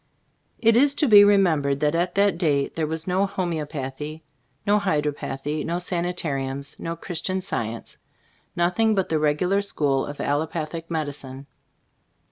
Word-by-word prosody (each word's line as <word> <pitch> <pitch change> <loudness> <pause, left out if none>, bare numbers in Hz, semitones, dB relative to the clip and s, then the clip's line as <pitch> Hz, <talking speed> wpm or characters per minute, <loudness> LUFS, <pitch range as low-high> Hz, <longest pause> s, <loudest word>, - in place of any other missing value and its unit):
It 230 -1 +4
is 280 +3 +4
to 300 - +2
be 205 -3 +9
remembered 160 -9 +3
at 170 +4 +1
that 200 -3 +3
date 145 -5 +1
there 160 -2 -1
was 160 +1 -4
no 190 +2 +1
homeopathy, 155 -4 -4 0.4
no 205 +1 +4
hydropathy, 150 -3 -2
no 170 +1 -2
sanitariums, 155 -7 -3
no 165 0 -4
Christian 180 +2 -3
Science, 115 - -4 0.6
nothing 180 +6 +2
but 190 -2 0
the 160 - +1
regular 165 +7 +2
school 145 -9 0
of 145 - -8
allopathic 160 +2 -2
medicine. 145 -4 -4
160 Hz, 130 wpm, -24 LUFS, 145-185 Hz, 0.6 s, be